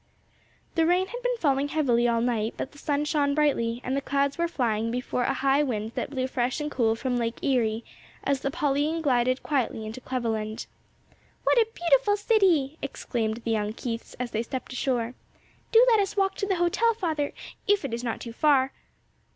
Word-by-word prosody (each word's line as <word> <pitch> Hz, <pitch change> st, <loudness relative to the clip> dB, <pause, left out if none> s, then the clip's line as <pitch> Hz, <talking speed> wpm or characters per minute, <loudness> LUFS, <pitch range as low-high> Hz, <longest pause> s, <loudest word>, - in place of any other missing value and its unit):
The 325 Hz, -1 st, +2 dB
rain 360 Hz, +2 st, +3 dB
had 485 Hz, +5 st, -7 dB
been -, -, 0 dB
falling 280 Hz, -7 st, +1 dB
heavily 250 Hz, -6 st, +2 dB
all 230 Hz, -1 st, +2 dB
night, 230 Hz, -2 st, 0 dB
but 265 Hz, -, -4 dB
the 290 Hz, -, -15 dB
sun 290 Hz, 0 st, 0 dB
shone 285 Hz, -2 st, +1 dB
brightly, 245 Hz, -6 st, +1 dB
and 260 Hz, -, -1 dB
the 275 Hz, -, 0 dB
clouds 280 Hz, 0 st, 0 dB
were 340 Hz, 0 st, 0 dB
flying 230 Hz, -7 st, 0 dB
before 250 Hz, +1 st, -1 dB
a 270 Hz, -, +1 dB
high 275 Hz, +2 st, +3 dB
wind 225 Hz, -6 st, -2 dB
that -, -, -3 dB
blew 260 Hz, -2 st, -2 dB
fresh 255 Hz, +1 st, -1 dB
and 300 Hz, 0 st, -3 dB
cool 225 Hz, -4 st, +2 dB
from 250 Hz, +1 st, -1 dB
Lake 230 Hz, -1 st, -1 dB
Erie 230 Hz, -4 st, +1 dB, 0.4 s
as 280 Hz, -1 st, +1 dB
the 275 Hz, -, -1 dB
Pauline 295 Hz, +3 st, 0 dB
glided 255 Hz, -2 st, +2 dB
quietly 250 Hz, -6 st, -1 dB
into 220 Hz, +4 st, -7 dB
Cleveland. 225 Hz, -4 st, -3 dB, 0.8 s
"What -, -, +4 dB
a 450 Hz, -, +4 dB
beautiful 410 Hz, +4 st, +3 dB
city!" 365 Hz, -, +2 dB
exclaimed 230 Hz, -4 st, -3 dB
the 230 Hz, -, 0 dB
young 210 Hz, -1 st, 0 dB
Keiths 230 Hz, -1 st, -5 dB
as 245 Hz, -1 st, -4 dB
they 220 Hz, -, 0 dB
stepped 255 Hz, +2 st, -5 dB
ashore. 245 Hz, -2 st, -1 dB, 0.6 s
"Do 460 Hz, +2 st, +7 dB
let 445 Hz, -, +5 dB
us 400 Hz, +1 st, -1 dB
walk 390 Hz, -1 st, +2 dB
to 400 Hz, -, -1 dB
the 390 Hz, -, +1 dB
hotel, 360 Hz, +7 st, +2 dB
father, 315 Hz, -8 st, -1 dB, 0.4 s
if 405 Hz, -6 st, +3 dB
it 255 Hz, -, -4 dB
is 235 Hz, +1 st, -3 dB
not 230 Hz, -2 st, -2 dB
too 230 Hz, -, -7 dB
far." 270 Hz, 0 st, +3 dB
270 Hz, 195 wpm, -27 LUFS, 235-315 Hz, 0.8 s, Do